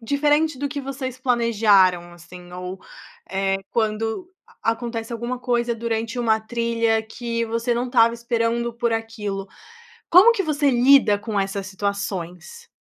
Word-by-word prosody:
diferente 295 +4 +1
do 285 +1 -2
que 285 - -5
vocês 260 -2 -6
planejaram 210 -8 +3
assim 175 +1 -13
ou, 180 +1 -6 0.5
eh, 195 0 0
quando 225 - -2 0.3
a 225 - +2
acontece 230 0 -5
alguma 235 +2 -4
coisa 240 -1 0
durante 230 +1 -3
uma 220 -2 +2
trilha 230 0 0
que 230 +1 -4
você 230 +2 -1
não 245 +2 -1
estava 230 -2 +4
esperando 235 0 -1
por 235 -1 -1
aquilo, 210 -3 -4 0.6
como 380 +7 +8
que 395 -4 -1
você 295 -2 +1
lida 245 -4 +5
com 210 -1 -2
essas 195 0 -3
situações? 200 - -5
230 Hz, 140 wpm, -22 LUFS, 210-250 Hz, 0.6 s, como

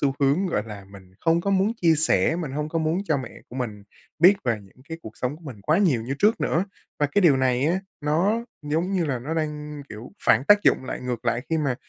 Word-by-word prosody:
xu 135 -2 +1
hướng, 145 +8 +2
gọi 135 - 0
là, 105 -3 -9
mình 95 -2 -15
không 165 0 +2
có 200 - -1
muốn 195 +3 +2
chia 165 -2 +5
sẻ, 155 - +3
mình 165 -6 -4
hông 150 +2 -2
có 165 - -1
muốn 160 +2 0
cho 155 -6 +1
mẹ 130 -4 -5 0.2
của 125 - -9
mình 110 -5 -4 0.4
biết 180 +5 +7
về 115 -4 0
những 95 -1 -19
cái 165 0 -6
cuộc 110 - -10
sống 130 +3 -3
của 170 - -19
mình 125 -9 -9
quá 155 - +2
nhiều 155 - +2
như 130 +4 -3
trước 215 +3 +3
nữa. 170 +4 +1 0.3
Và 145 - +2
cái 200 +8 +1
điều 155 -6 +6
này 130 0 +1
á, 180 +4 +1 0.2
nó 180 +10 +1 0.2
giống 160 +6 -1
như 185 -3 +1
là 140 -5 -1
nó 145 +7 -4
đang, 150 -2 -4
kiểu, 110 - -10
phản 115 +5 +4
tác 205 +5 +6
dụng - - +3
lại - - -5
ngược 125 -2 -4
lại, 120 +1 0
khi 160 - +2
mà 140 -4 0
150 Hz, 255 wpm, -24 LUFS, 125-170 Hz, 0.4 s, biết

